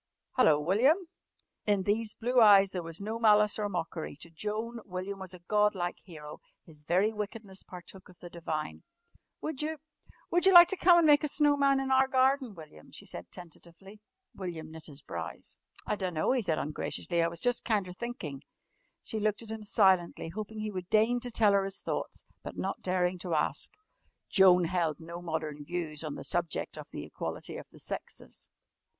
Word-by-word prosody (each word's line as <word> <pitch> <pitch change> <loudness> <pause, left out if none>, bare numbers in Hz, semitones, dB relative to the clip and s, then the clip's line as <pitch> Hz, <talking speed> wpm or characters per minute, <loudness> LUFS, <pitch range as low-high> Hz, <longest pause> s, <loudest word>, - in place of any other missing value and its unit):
"Hello, 155 -13 +4
William!" 215 - +4 0.7
In 205 -2 +2
these 210 +2 0
blue 245 +2 +2
eyes 200 -3 +7
there 180 - -3
was 165 +3 -6
no 220 +2 -3
malice 210 -1 +4
or 205 -1 -1
mockery. 170 -4 -4
To 170 - -11
Joan 215 +7 -4
William 190 +1 -5
was 190 -1 -7
a 180 -2 -12
god 210 -1 +3
like 175 -1 -3
hero. 150 -5 -10 0.3
His 155 -2 -13
very 190 +8 +2
wickedness 210 -2 -6
partook 180 +2 -12
of 180 - -17
the 175 - -9
divine. 160 -3 -5 0.6
"Would 310 -3 -4
you 310 +1 -2 0.5
would 350 +2 +3
you 385 - +6
like 345 0 +11
to 385 - +1
come 355 -1 +6
an' 340 - +5
make 295 0 +6
a - - +1
snow 290 0 +3
man 275 -1 +3
in 265 0 -2
our 265 0 +5
garden, 260 -3 +2
William?" 155 - -13
she - - -11
said 85 0 -9
tentatively. 175 +4 -13 0.3
William 165 -5 -6
knit 160 0 -8
his 145 -2 -12
brows. 85 -2 -7 0.3
"I - - 0
dunno," 180 -5 -1
he 260 -1 +2
said 165 -7 0
ungraciously. 170 +3 -1
"I 165 - +3
was 170 0 -5
jus' 245 0 +1
kinder 200 -5 -1
thinkin'." 180 - -6 0.6
She 220 - -4
looked 215 +1 0
at 220 - -9
him 220 -1 -6
silently, 190 -6 +2
hoping 215 +4 -6
that 215 - -4
he 215 - -3
would 185 -2 -6
deign 225 +3 +3
to 245 0 -4
tell 215 -3 +3
her 200 -1 +3
his 195 0 -3
thoughts, - - -4 0.2
but - - -8
not 195 - -3
daring 180 -1 0
to 175 -2 -2
ask. - - 0 0.6
Joan 185 -2 +6
held 170 -2 0
no 170 +1 -8
modern 155 -3 -4
views 160 -1 -4
on 150 -2 -4
the - - -7
subject 175 -2 -1
of - - -9
the - - -6
equality - - -6
of - - -10
the - - -17
sexes. - - -7
195 Hz, 195 wpm, -30 LUFS, 170-225 Hz, 0.7 s, like